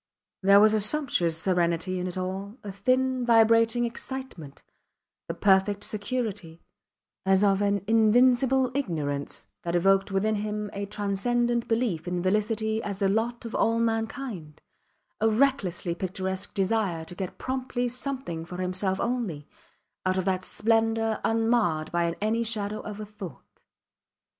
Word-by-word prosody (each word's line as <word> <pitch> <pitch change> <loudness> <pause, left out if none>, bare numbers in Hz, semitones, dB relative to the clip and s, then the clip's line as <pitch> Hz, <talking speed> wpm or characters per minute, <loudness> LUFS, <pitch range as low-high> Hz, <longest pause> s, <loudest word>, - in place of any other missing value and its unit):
There 200 +1 +7
was 215 +1 +6
a 215 - +3
sumptuous 210 - +1
serenity 180 +1 0
in 180 - -2
it 180 - -6
all, 190 +4 -4
a 205 - -5
thin, 255 +5 +1
vibrating 230 0 +4
excitement, 235 - -7 0.6
the - - -4
perfect 200 +1 +3
security, 205 -6 -4 0.6
as 190 +1 +3
of 195 -1 +3
an 200 -2 +1
invincible 245 +4 +4
ignorance, 150 - -3 0.2
that 170 0 -2
evoked 195 +3 +3
within 200 +3 +1
him 210 0 -3
a 200 0 -4
transcendent 230 +4 0
belief 225 -8 -1
in 175 0 -2
felicity 220 +3 0
as 200 -3 -4
the 195 -1 +1
lot 235 +4 -1
of 230 - -6
all 230 +1 +2
mankind, 225 - -3 0.6
a 220 - +3
recklessly 215 -8 +1
picturesque 190 +2 -4
desire 195 -5 0
to 170 - -9
get 185 0 -6
promptly 255 -1 -2
something 250 - -4
for 180 +2 -8
himself 185 +1 0
only, 220 -12 -2 0.6
out 185 0 +1
of 185 - 0
that 185 -1 0
splendour 225 +1 +1
unmarred 225 -9 +1
by 170 -1 +1
any 220 +2 0
shadow 215 -2 -3
of 210 -1 -7
a 215 - -5
thought. 195 -10 -11
205 Hz, 140 wpm, -27 LUFS, 185-230 Hz, 0.6 s, There